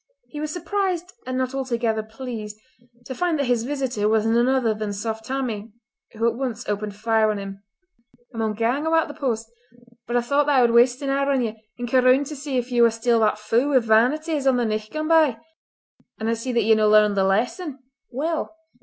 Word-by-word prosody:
He 295 Hz, -, -7 dB
was 305 Hz, 0 st, -3 dB
surprised 360 Hz, +1 st, -2 dB
and 255 Hz, 0 st, -2 dB
not 260 Hz, 0 st, -1 dB
altogether 235 Hz, -4 st, -1 dB
pleased 220 Hz, -1 st, -7 dB, 0.5 s
to 260 Hz, -, -5 dB
find 340 Hz, +4 st, 0 dB
that 280 Hz, -, 0 dB
his 240 Hz, -2 st, 0 dB
visitor 260 Hz, -6 st, -1 dB
was 220 Hz, 0 st, +2 dB
none 235 Hz, +2 st, +3 dB
other 260 Hz, -4 st, +2 dB
than 215 Hz, -1 st, -4 dB
Saft 220 Hz, +2 st, -4 dB
Tammie, 230 Hz, -5 st, -4 dB, 0.4 s
who 225 Hz, +1 st, 0 dB
at 235 Hz, -, +1 dB
once 245 Hz, -2 st, -4 dB
opened 210 Hz, 0 st, -3 dB
fire 220 Hz, 0 st, +2 dB
on 210 Hz, -, -1 dB
him: 195 Hz, 0 st, -7 dB, 0.7 s
"I 225 Hz, -, -6 dB
maun 220 Hz, -1 st, -1 dB
gang 245 Hz, +8 st, 0 dB
awa' 325 Hz, 0 st, +4 dB
t' -, -, -8 dB
the -, -, -6 dB
post; 230 Hz, -4 st, -2 dB, 0.6 s
but 240 Hz, -, 0 dB
I -, -, +2 dB
thocht 280 Hz, +4 st, +1 dB
that 290 Hz, -2 st, +3 dB
I -, -, +6 dB
would 240 Hz, -1 st, +4 dB
waste 245 Hz, +3 st, +4 dB
an 275 Hz, -, -1 dB
hour 275 Hz, +1 st, +1 dB
on 265 Hz, -2 st, +1 dB
ye, 225 Hz, -1 st, -3 dB, 0.2 s
and 245 Hz, 0 st, -4 dB
ca' 255 Hz, +2 st, +3 dB
roond 255 Hz, +2 st, +5 dB
just -, -, -8 dB
to 305 Hz, -, -6 dB
see 275 Hz, -1 st, -3 dB
if 245 Hz, +1 st, -3 dB
ye 240 Hz, -1 st, +2 dB
waur 235 Hz, -, +7 dB
still 230 Hz, +1 st, +1 dB
that 215 Hz, -1 st, +2 dB
fou 230 Hz, +6 st, 0 dB
wi' 280 Hz, -, +4 dB
vanity 250 Hz, +8 st, +2 dB
as 285 Hz, -3 st, -1 dB
on 260 Hz, -2 st, +4 dB
the 240 Hz, -, +1 dB
nicht 215 Hz, 0 st, -3 dB
gane 310 Hz, 0 st, -3 dB
by. 315 Hz, -7 st, +4 dB, 0.8 s
An 220 Hz, -, -4 dB
I 230 Hz, -, +2 dB
see 230 Hz, +3 st, -4 dB
that 235 Hz, -2 st, +1 dB
ye've 220 Hz, +1 st, +4 dB
no 215 Hz, -1 st, +3 dB
learned 210 Hz, -1 st, +5 dB
the 195 Hz, -, +2 dB
lesson. 250 Hz, -, -1 dB, 0.3 s
Well! 320 Hz, +5 st, -3 dB
240 Hz, 235 wpm, -23 LUFS, 220-275 Hz, 0.8 s, waur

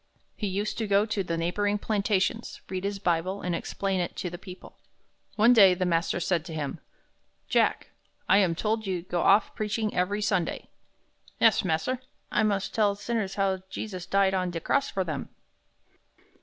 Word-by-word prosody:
He 210 Hz, -, -3 dB
used 200 Hz, +4 st, -2 dB
to 220 Hz, -, -1 dB
go 200 Hz, +1 st, +3 dB
to 210 Hz, -3 st, -1 dB
the 170 Hz, -2 st, -2 dB
neighboring 205 Hz, +5 st, 0 dB
plantations, 210 Hz, +1 st, -1 dB
read 185 Hz, 0 st, -3 dB
his 200 Hz, 0 st, -2 dB
Bible, 185 Hz, +1 st, -1 dB
and 180 Hz, -, -1 dB
explain 195 Hz, +3 st, -2 dB
it 175 Hz, -, -2 dB
to 180 Hz, -, -4 dB
the 175 Hz, -, -7 dB
people. 185 Hz, -2 st, -12 dB, 0.6 s
One 225 Hz, +3 st, +6 dB
day 195 Hz, -6 st, +7 dB
the 185 Hz, 0 st, -1 dB
master 170 Hz, 0 st, +1 dB
said 175 Hz, -1 st, 0 dB
to 165 Hz, -3 st, -7 dB
him, 145 Hz, -3 st, -4 dB, 0.7 s
"Jack, -, -, +1 dB, 0.4 s
I 195 Hz, -, +6 dB
am 180 Hz, -4 st, +2 dB
told 220 Hz, +5 st, 0 dB
that 215 Hz, -, -9 dB
you 180 Hz, -3 st, -2 dB
go 175 Hz, -1 st, -2 dB
off 200 Hz, +2 st, +4 dB
preaching 215 Hz, 0 st, -2 dB
every 200 Hz, +4 st, 0 dB
Sunday." 190 Hz, -5 st, -1 dB, 0.7 s
"Yes, 225 Hz, -3 st, +5 dB
mas'r, 185 Hz, +9 st, 0 dB, 0.3 s
I -, -, +2 dB
must 205 Hz, -2 st, 0 dB
tell 205 Hz, -2 st, +2 dB
sinners 205 Hz, -1 st, -2 dB
how 195 Hz, -2 st, 0 dB
Jesus 190 Hz, -2 st, -6 dB
died 195 Hz, 0 st, +3 dB
on 185 Hz, -1 st, 0 dB
de 170 Hz, -1 st, -4 dB
cross 280 Hz, +10 st, +1 dB
for 190 Hz, -, -1 dB
dem." 155 Hz, -6 st, -5 dB
195 Hz, 180 wpm, -27 LUFS, 180-210 Hz, 0.7 s, day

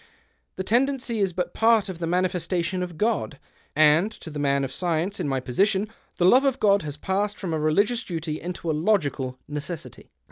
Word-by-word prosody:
o -, -, -31 dB, 0.2 s
The 190 Hz, -, -3 dB
tendency 240 Hz, +1 st, +1 dB
is 195 Hz, -2 st, +1 dB
but 180 Hz, +1 st, -3 dB
part 225 Hz, -2 st, +3 dB
of 185 Hz, -3 st, -6 dB
the 165 Hz, -, -2 dB
manifestation 180 Hz, 0 st, 0 dB
of 175 Hz, -3 st, -5 dB
God, 215 Hz, -8 st, 0 dB, 0.4 s
and 155 Hz, +7 st, +4 dB
to 165 Hz, -, -10 dB
the 150 Hz, -, -5 dB
man 140 Hz, -1 st, +1 dB
of 135 Hz, -, -3 dB
science 175 Hz, +4 st, -1 dB
in -, -, -1 dB
my 135 Hz, -1 st, 0 dB
position 190 Hz, -, +1 dB, 0.3 s
the 175 Hz, -, +1 dB
love 255 Hz, +9 st, +6 dB
of 270 Hz, -2 st, +1 dB
God 200 Hz, -1 st, +4 dB
has 150 Hz, -2 st, -6 dB
passed 200 Hz, +5 st, -1 dB
from 180 Hz, -4 st, -4 dB
a 160 Hz, -, 0 dB
religious 205 Hz, +11 st, +2 dB
duty 160 Hz, -5 st, -4 dB
into 175 Hz, -1 st, -3 dB
a -, -, 0 dB
logical 150 Hz, -7 st, 0 dB
necessity. 150 Hz, +3 st, -7 dB
180 Hz, 200 wpm, -25 LUFS, 155-205 Hz, 0.4 s, love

